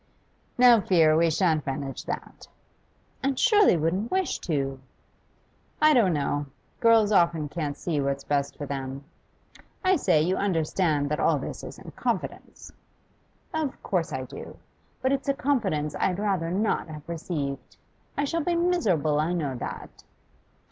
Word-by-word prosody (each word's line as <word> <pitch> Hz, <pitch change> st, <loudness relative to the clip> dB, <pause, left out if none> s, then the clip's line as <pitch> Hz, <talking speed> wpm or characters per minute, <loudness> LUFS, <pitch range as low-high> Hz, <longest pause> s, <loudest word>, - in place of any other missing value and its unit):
'No 245 Hz, -3 st, +7 dB
fear! 165 Hz, -5 st, +4 dB
We 165 Hz, +1 st, +4 dB
shan't 160 Hz, -2 st, +1 dB
manage 135 Hz, 0 st, -4 dB
that.' -, -, -6 dB, 0.7 s
'And 270 Hz, -1 st, 0 dB
surely 420 Hz, -, +5 dB
wouldn't 180 Hz, +8 st, -1 dB
wish 375 Hz, -2 st, 0 dB
to?' 135 Hz, -5 st, -2 dB, 1.0 s
'I 305 Hz, 0 st, +6 dB
don't 215 Hz, -, +4 dB
know. 145 Hz, -1 st, -1 dB, 0.3 s
Girls 225 Hz, -3 st, +5 dB
often 170 Hz, -6 st, +3 dB
can't 145 Hz, -2 st, -4 dB
see 155 Hz, -5 st, -1 dB
what's 140 Hz, 0 st, -2 dB
best 140 Hz, -1 st, -1 dB
for 145 Hz, -, -5 dB
them. 135 Hz, 0 st, -5 dB, 0.8 s
I 375 Hz, 0 st, +4 dB
say, 155 Hz, -, +3 dB
you 180 Hz, +5 st, +1 dB
understand 160 Hz, -5 st, 0 dB
that 150 Hz, -, 0 dB
all -, -, +3 dB
this -, -, -6 dB
is -, -, -8 dB
in -, -, -11 dB
confidence?' -, -, -4 dB, 0.8 s
'Of 315 Hz, -4 st, -3 dB
course 175 Hz, -5 st, -1 dB
I 130 Hz, -2 st, -3 dB
do. 130 Hz, -, -10 dB, 0.5 s
But 260 Hz, -, +2 dB
it's 275 Hz, 0 st, -1 dB
a 275 Hz, -, +2 dB
confidence 195 Hz, -, 0 dB
I -, -, -1 dB
had 180 Hz, -2 st, 0 dB
rather 195 Hz, -5 st, 0 dB
not 200 Hz, +3 st, 0 dB
have 155 Hz, -1 st, -10 dB
received. 155 Hz, -5 st, -4 dB, 0.4 s
I 285 Hz, -, +1 dB
shall 330 Hz, +4 st, -1 dB
be 345 Hz, +1 st, 0 dB
miserable, 200 Hz, -, +1 dB
I 160 Hz, +3 st, 0 dB
know 150 Hz, -6 st, -1 dB
that. 120 Hz, -, -7 dB
170 Hz, 155 wpm, -26 LUFS, 145-230 Hz, 1.0 s, No